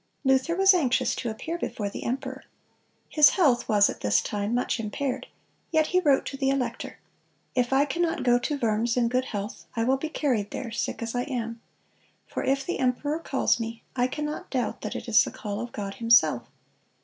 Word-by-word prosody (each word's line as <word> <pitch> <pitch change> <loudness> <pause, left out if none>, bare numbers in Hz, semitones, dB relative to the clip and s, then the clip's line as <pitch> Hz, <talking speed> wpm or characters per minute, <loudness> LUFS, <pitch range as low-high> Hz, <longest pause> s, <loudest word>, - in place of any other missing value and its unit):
Luther 265 +4 +2
was 385 +1 +6
anxious 275 -9 +2
to 240 - -3
appear 325 +10 -5
before 205 -10 -3
the 200 - -6
emperor. 265 +2 -4 0.6
His 300 -2 +6
health 280 -10 +3
was 205 -2 +5
at - - -5
this 105 - +3
time 205 +2 -2
much 245 0 0
impaired; 255 +4 -3 0.4
yet 315 -1 +3
he 365 - +5
wrote 285 -6 +3
to 275 - -5
the 270 -1 +1
elector: 270 -2 -2 0.6
"If 245 -1 +1
I 270 +2 +4
cannot 335 +2 -1
go 245 -1 +4
to 290 +4 -2
Worms 230 -1 0
in 235 -1 +2
good 255 +1 0
health, 205 -1 -5
I 230 - +1
will 260 +3 +2
be 310 +3 -4
carried 245 -10 0
there, 245 -4 -5
sick 230 - -3
as 230 - -4
I 245 0 -1
am. 230 -4 -4 0.6
For - - -4
if 270 0 0
the 355 - -3
emperor 275 +4 0
calls 275 -6 +1
me, 230 0 -5
I 250 -1 +2
cannot 300 +3 -5
doubt 250 -5 -2
that - - -5
it - - -6
is 225 -2 +6
the - - -4
call 205 -1 -5
of 240 +1 -5
God 200 -1 -5
Himself. 225 - +3
250 Hz, 200 wpm, -26 LUFS, 230-280 Hz, 0.6 s, was